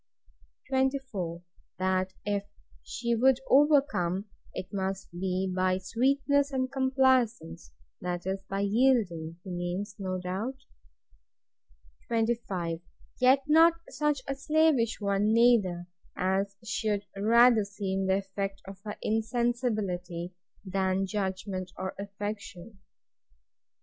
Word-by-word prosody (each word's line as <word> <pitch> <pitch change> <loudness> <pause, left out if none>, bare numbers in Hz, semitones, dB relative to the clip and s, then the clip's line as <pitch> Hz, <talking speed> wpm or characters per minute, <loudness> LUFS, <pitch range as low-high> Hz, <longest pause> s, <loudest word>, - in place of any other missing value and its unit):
24. 260 -11 -1 0.3
That 185 0 0
if 205 -1 -1 0.3
she 235 0 -2
would 255 +2 +4
overcome, 270 - +3 0.3
it 185 - -6
must 195 0 -3
be 185 +2 -1
by 185 0 +2
sweetness 275 +8 +1
and 260 -1 -1
complaisance; 260 - +1 0.3
that 175 -1 -3
is, 190 +1 -2
by 195 0 -1
yielding, 200 -7 +2
he 190 - -7
means, 180 +4 -3
no 185 -1 -2
doubt. 190 +8 -3 1.5
25. 225 -8 -1 0.4
Yet 260 +2 +5
not 325 +2 +7 0.2
such 295 -3 0
a 275 - -1
slavish 280 -4 +2
one 200 +1 +1
neither, 220 -7 +4 0.3
as 195 +2 0
should 210 -2 -1
rather 230 +2 +5
seem 195 -1 -3
the 190 0 +3
effect 195 0 -4
of 195 0 -10
her 210 -1 -5
insensibility, 215 -6 -1 0.3
than 190 0 0
judgment 190 -2 -3
or 190 0 -4
affection. 205 0 -6
200 Hz, 105 wpm, -29 LUFS, 185-245 Hz, 1.5 s, not